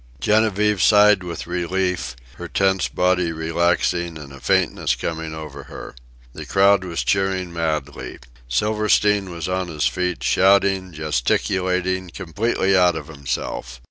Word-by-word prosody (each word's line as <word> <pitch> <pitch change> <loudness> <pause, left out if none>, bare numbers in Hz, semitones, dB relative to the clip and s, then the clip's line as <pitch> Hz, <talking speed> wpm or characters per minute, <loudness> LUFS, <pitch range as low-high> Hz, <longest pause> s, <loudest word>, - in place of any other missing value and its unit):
Genevieve 105 - +2
sighed 105 -2 +5
with 85 -2 -6
relief, 90 -6 -2 0.2
her - - -7
tense 95 -1 +1
body 90 -2 +1
relaxing 85 +1 0
and 70 -3 -11
a 70 - -11
faintness - - +1
coming 80 -1 -4
over 75 -3 -9
her. - - -9 0.4
The - - -9
crowd 100 0 +4
was 85 -3 -3
cheering 95 -2 0
madly. 75 -4 -3 0.3
Silverstein 105 - +1
was 85 -2 -5
on 90 0 -2
his 75 -4 -2
feet, 90 -1 -1
shouting, 95 -1 +3
gesticulating, 90 +5 -1
completely 95 +3 -1
out 90 -2 +4
of 75 -2 -7
himself. 65 -3 -5
90 Hz, 130 wpm, -21 LUFS, 80-95 Hz, 0.4 s, sighed